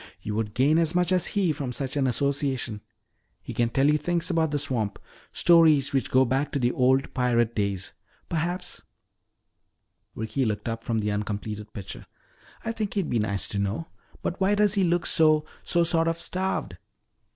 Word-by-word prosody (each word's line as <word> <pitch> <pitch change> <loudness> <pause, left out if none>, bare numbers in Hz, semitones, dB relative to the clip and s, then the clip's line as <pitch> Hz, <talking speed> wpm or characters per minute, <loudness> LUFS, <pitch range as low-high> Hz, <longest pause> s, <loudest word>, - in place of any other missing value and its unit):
You 105 - -5
would 105 -1 -3
gain 145 +6 +4
as 165 0 +1
much 180 0 +2
as 180 -2 +2
he 185 -6 +2
from 135 -4 -4
such 135 +2 -3
an 140 -2 +1
association. 130 -4 0 0.6
He - - -8
can 120 -1 +1
tell 135 +3 +2
you 150 0 +3
things 175 +3 -1
about 165 -2 +2
the 145 - -1
swamp 125 -7 -2 0.3
stories 155 -5 +4
which 130 -8 0
go 130 +1 +4
back 135 +4 0
to - - +1
the 125 -2 +1
old 130 +2 +2
pirate 120 -2 +1
days. 100 -3 -2 0.3
Perhaps 175 +2 -3 0.7
" - - -50
Ricky 110 +5 -2
looked 105 -2 -2
up 115 0 -3
from 115 -2 -1
the 105 0 -1
uncompleted 105 +1 -4
picture. 100 -4 -8 0.6
"I 225 - 0
think 215 -3 -4
he'd 195 -6 -1
be 120 - +2
nice 100 -2 -1
to 100 - -2
know. 100 +11 -2 0.3
But 175 - -3
why 195 +2 +3
does 210 -1 +3
he 200 -2 +2
look 175 -1 +1
so 155 -2 +4 0.2
so 170 0 +2
sort 165 -1 +2
of 165 0 -1
starved?" 185 +3 -2
140 Hz, 185 wpm, -26 LUFS, 115-165 Hz, 0.7 s, gain